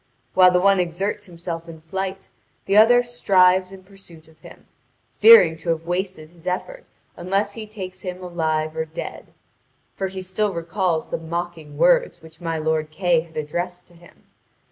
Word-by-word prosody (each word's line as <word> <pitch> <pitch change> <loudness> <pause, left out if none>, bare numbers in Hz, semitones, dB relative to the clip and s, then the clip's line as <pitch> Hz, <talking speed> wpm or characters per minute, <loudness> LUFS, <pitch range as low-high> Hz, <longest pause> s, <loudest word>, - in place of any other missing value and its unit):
While 185 -1 +7
the 180 0 +2
one 195 +1 +4
exerts 195 +4 -2
himself 170 -1 -7
in 160 -1 -11
flight 190 +3 -5 0.3
the 195 - 0
other 240 +3 +6
strives 185 -6 +3
in 190 -1 -12
pursuit 185 -5 -16
of 160 -1 -22
him, - - -15 0.5
fearing 450 - +7
to 165 +2 -6
have 165 0 -1
wasted 175 -3 -4
his 170 -1 -16
effort - - -4 0.3
unless 195 +3 -1
he 220 -1 -8
takes 185 -3 -8
him 180 -1 -6
alive 160 -3 -2
or 160 0 -2
dead; 160 +1 -8 0.7
for 195 - -3
he 190 0 -7
still 195 +2 -1
recalls 170 -1 -1
the - - -3
mocking 165 -2 -6
words - - +3
which 160 0 -17
my 165 -1 -2
lord 155 0 -1
Kay 175 +1 +1
had 160 0 -10
addressed 175 +4 -4
to - - -21
him. 170 0 -20
180 Hz, 170 wpm, -22 LUFS, 165-195 Hz, 0.7 s, While